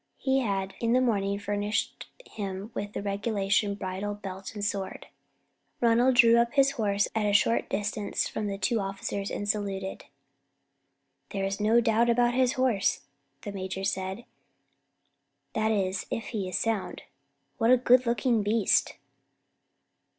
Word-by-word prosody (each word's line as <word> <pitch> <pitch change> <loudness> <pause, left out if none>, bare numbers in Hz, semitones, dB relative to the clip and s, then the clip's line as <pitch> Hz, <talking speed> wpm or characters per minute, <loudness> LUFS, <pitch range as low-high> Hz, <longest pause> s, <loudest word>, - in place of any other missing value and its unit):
He 265 0 +1
had 195 -5 -2
in 230 0 +1
the 255 - +5
morning 200 -5 +1
furnished 205 +1 -2 0.2
him 200 +1 -6
with 205 +1 -5
the - - -4
regulation 200 0 0
bridle, 200 +1 -4
belt, 195 0 -8
and 205 -1 -3
sword. 200 -2 -3 0.7
Ronald 240 +2 +4
drew 235 -1 +7
up 235 +2 +1
his 275 -1 +4
horse 205 -5 0
at 220 -1 0
a 205 - +1
short 230 +3 +2
distance 205 0 -2
from 215 - -3
the 200 -1 -3
two 230 +3 0
officers 195 0 -4
and 205 - -4
saluted. 200 -2 -2 1.2
"There's 195 0 -2
no 220 +3 +4
doubt 230 +1 +2
about 240 +1 +3
his 255 0 +2
horse," 250 -7 +1 0.4
the 205 - -5
major 190 -1 -5
said, 190 +3 -3 1.3
"that 220 0 +1
is 195 -3 -1
if 230 - -4
he 200 -5 -3
is - - -1
sound. 225 -4 -2 0.6
What 225 0 +3
a 255 - +7
good 250 0 +4
looking 235 -1 +2
beast!" 210 0 +2
205 Hz, 145 wpm, -28 LUFS, 195-235 Hz, 1.3 s, drew